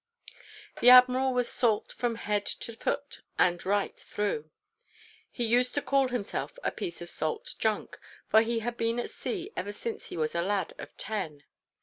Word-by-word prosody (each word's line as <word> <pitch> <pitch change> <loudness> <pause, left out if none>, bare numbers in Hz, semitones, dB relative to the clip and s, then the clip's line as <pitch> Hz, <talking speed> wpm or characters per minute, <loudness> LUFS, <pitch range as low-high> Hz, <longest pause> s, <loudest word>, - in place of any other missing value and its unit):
The 245 - +7
Admiral 255 +1 +7
was 250 -1 +1
salt 225 -4 +2
from 240 -2 -1
head 210 -2 -1
to 230 - -4
foot 285 +5 -3 0.2
and 175 -1 +3
right 200 +1 0
through. 200 -7 -3 0.8
He 240 - -2
used 245 +2 +2
to 290 - +1
call 275 -1 +3
himself 245 - -3
a - - +1
piece 345 - -5
of 175 - -6
salt 155 -1 -2
junk: 215 -2 -1 0.3
for 220 - +6
he 230 0 0
had 240 +1 -3
been 230 +1 0
at - - -3
sea 385 0 -4
ever 205 - -3
since 225 +2 -5
he - - -7
was 155 -1 0
a 170 - 0
lad 195 -1 -1
of - - -10
ten. 165 -9 -4
230 Hz, 180 wpm, -29 LUFS, 200-250 Hz, 0.8 s, The